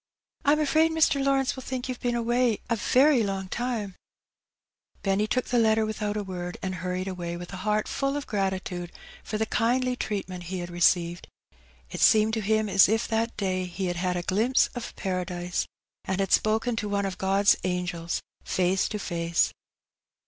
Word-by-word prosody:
'^ 285 - +5
Vm - - -2
afraid 315 +2 +3
Mr. 310 -3 +3
Lawrence 270 0 +2
will 260 - -7
think 255 0 -4
youVe 255 -1 -4
been 240 -1 -1
away 240 -1 +2
a - - +4
very 260 +4 +4
long 195 -2 -2
time/' 235 -5 -2 1.1
Benny 200 +2 +1
took 255 +3 0
the 245 - +1
letter 220 -1 +3
without 215 -1 -2
a 205 - -3
word^ 180 -1 -5
and 190 -1 -2
hurried 180 +1 -3
away 175 -2 -4
with 175 +2 -8
a - - -5
heart 210 +3 0
fall 275 +1 -1
of 290 - -4
gratitude 190 -4 -2 0.3
for 215 - -3
the 220 - 0
kindly 250 +3 +1
treatment 190 -6 -4
he 185 +2 -4
had 175 -1 -5
received. 175 0 +2 0.6
It - - -5
seemed 220 0 +5
to 220 - 0
him 215 +1 +1
as 195 -1 +6
if 225 +1 0
tiiat 225 +1 -1
day 185 -2 -1
he 180 +2 -4
had 175 -1 -2
had 180 0 0
a 175 - -3
glimpse 220 +9 +2
of 245 -2 -6
Paradise^ 180 -1 -2 0.4
and 190 0 -1
had 195 -1 0
spoken 225 +3 +2
to 210 -2 -2
one 200 0 0
of 190 -1 -4
God's 195 +1 +4
angels 180 -2 -2 0.2
face 185 +1 +1
to 215 - -3
face. 170 -2 0
200 Hz, 185 wpm, -27 LUFS, 185-235 Hz, 1.1 s, as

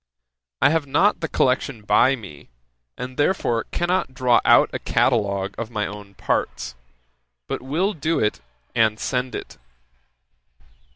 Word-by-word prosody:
I - - +6
have 160 -3 0
not 190 +10 +3
the 160 - -2
collection 130 -5 0
by 130 +5 +4
me, 95 - -12 0.5
and 130 0 -6
therefore 145 -7 +1
cannot 175 -6 -1
draw 125 -3 +3
out - - +5
a - - -2
catalogue 100 -1 +1
of 115 -1 -4
my 105 -3 -2
own 100 -1 -9
parts, - - -2 0.7
but - - -3
will 165 +11 0
do 160 0 -1
it, 105 - 0 0.3
and 110 -2 +2
send 125 -1 -2
it. - - -8
125 Hz, 135 wpm, -22 LUFS, 105-145 Hz, 0.7 s, I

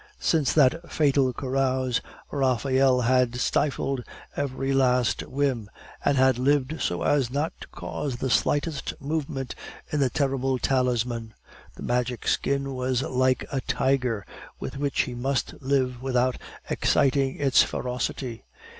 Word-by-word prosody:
Since 155 -5 +2
that 160 +4 +3
fatal 140 -3 +3
carouse, 130 -1 0 0.3
Raphael 130 -1 +2
had 125 0 +2
stifled 135 0 0 0.3
every 135 -1 -1
least 125 -2 +2
whim, 130 -6 -1 0.3
and 140 - +2
had 130 -1 +4
lived 145 +3 +1
so 85 -1 -1
as 140 -5 +2
not 145 +5 -1
to - - -8
cause 140 -4 -5
the 130 +1 -2
slightest 145 +2 0
movement 140 -3 -3 0.4
in 150 - 0
the 135 -2 +3
terrible 135 -1 0
talisman. 120 -3 0 0.4
The - - -9
Magic 125 0 -1
Skin 140 0 0
was 130 0 0
like 130 0 +1
a 135 -2 -1
tiger 125 -6 0 0.3
with - - -5
which 140 0 0
he 125 - -4
must 130 +3 -2
live 130 -2 0
without 130 -1 +1 0.3
exciting 135 -1 +2
its 135 -3 +5
ferocity. 125 -1 -3
130 Hz, 130 wpm, -26 LUFS, 125-140 Hz, 0.4 s, its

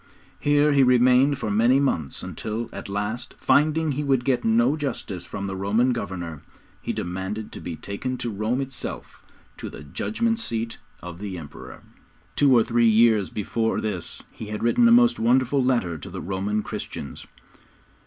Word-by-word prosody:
Here 145 +1 +3
he 140 - +5
remained 125 +2 +5
for 110 -6 -3
many 120 +6 +4
months, 85 - -1
until, 115 +2 -4
at - - -7
last, 105 +4 -3
finding 155 +1 +2
he 145 +2 -2
would 135 -4 +1
get 130 -3 +1
no 225 -4 +3
justice 115 - -4
from 100 - -5
the 95 -1 -4
Roman 110 +6 +2
governor, 90 -8 -5 0.4
he - - -3
demanded 95 +4 -4
to - - -9
be 85 - -5
taken 100 +10 -4
to 120 - -3
Rome 110 +6 -1
itself 135 -1 -7 0.3
to - - -6
the 75 - -10
Judgment 225 - -1
Seat 115 - -3 0.2
of 90 -1 -8
the 100 -3 -5
Emperor. 75 -4 -10 0.5
Two 140 -2 +4
or 115 - +5
three 120 0 +3
years 110 -3 +4
before 110 +2 -1
this 95 -6 -3
he 110 - -9
had 105 +1 -5
written 235 - +4
a - - +5
most 240 0 +5
wonderful 130 +3 +3
letter 105 -11 0
to - - -9
the - - -6
Roman 100 +3 -2
Christians. 70 - -7
115 Hz, 170 wpm, -24 LUFS, 100-135 Hz, 0.5 s, he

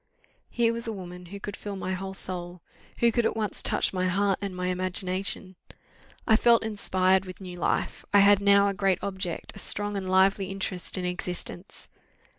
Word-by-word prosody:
Here 230 -1 +2
was 235 +1 -4
a - - -1
woman 180 -3 -8
who 200 +3 -8
could 200 0 -6
fill 205 -1 -6
my 190 -1 -3
whole 190 +1 -5
soul; 175 -2 -6 0.4
who 235 0 +5
could 235 +1 +1
at - - 0
once 215 -2 -2
touch - - +1
my 185 -1 0
heart 195 +1 +1
and 195 -2 -4
my 180 0 -2
imagination. 185 +1 -2 0.7
I 220 - +5
felt 235 0 +5
inspired 190 -3 +2
with 185 -1 -9
new 180 -2 -8
life - - -1
I 205 - +7
had 200 0 +6
now 200 0 +5
a 200 - 0
great 195 -2 +2
object, 190 -3 -4
a - - -9
strong 205 0 -2
and 190 -2 -3
lively 190 +1 +3
interest 195 -1 -1
in 180 - -2
existence. 180 0 -5
190 Hz, 190 wpm, -27 LUFS, 185-200 Hz, 0.7 s, I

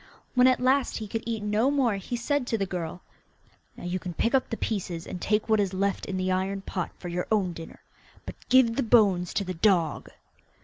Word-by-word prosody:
When 250 0 +5
at 255 -1 +3
last 260 +1 +2
he 220 - -5
could 225 +2 -3
eat 225 -2 -2
no 210 +5 +2
more 260 -7 +1
he 195 +5 -5
said 250 +2 -1
to 225 - 0
the 200 - -1
girl, 175 -2 -5 0.7
'Now - - -10
you 175 +1 -2
can 175 -1 -7
pick 230 - 0
up 265 - +2
the 225 - -3
pieces, 180 -6 -3
and 180 - -7
take 210 +1 +1
what 220 -1 +3
is 195 -2 0
left 200 +1 -1
in 190 - -3
the 185 0 0
iron 190 +1 -1
pot 185 -2 -4
for 180 - -8
your 175 +1 -3
own 195 -5 +1
dinner, 165 0 -11 0.4
but - - -6 0.2
give 250 -3 +5
the - - +2
bones 205 -7 +3
to 200 - +1
the 185 -1 -4
dog. 170 -4 +1
200 Hz, 225 wpm, -27 LUFS, 185-235 Hz, 0.7 s, When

